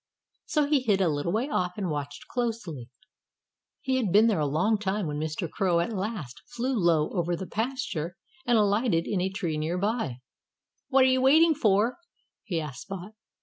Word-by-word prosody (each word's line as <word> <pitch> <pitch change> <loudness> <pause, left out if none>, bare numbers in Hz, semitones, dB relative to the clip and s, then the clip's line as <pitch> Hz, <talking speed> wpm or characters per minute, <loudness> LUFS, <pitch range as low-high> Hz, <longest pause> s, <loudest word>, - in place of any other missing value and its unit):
So 300 -2 +2
he 285 -2 +2
hid 210 -6 +2
a 190 - +3
little 145 +2 -1
way 225 +7 0
off 180 -11 -1
and 190 -5 -2
watched 145 -1 -5
closely. 220 - -3 0.9
He 265 -2 0
had 220 -8 0
been 210 +4 +6
there 220 -7 +2
a 150 - +1
long 205 +10 +1
time 205 -1 -1
when 150 -1 -3
Mr. 155 +3 -3
Crow 180 0 +1
at 175 +7 -1
last 190 - -4
flew 255 +3 -2
low 170 -7 +2
over 175 -1 0
the 190 - -5
pasture 210 - -3 0.3
and 240 -2 +3
alighted 205 -4 +2
in 195 -4 -1
a 190 - 0
tree 175 -6 -3
near 160 +4 -1
by. 200 - -1 0.7
"What 270 -1 +5
are - - +5
you 260 0 +3
waiting 315 +5 +6
for?" 220 - +2 0.4
he 170 -4 -2
asked 140 -6 -6
Spot. 195 0 -7
195 Hz, 190 wpm, -27 LUFS, 165-235 Hz, 0.9 s, been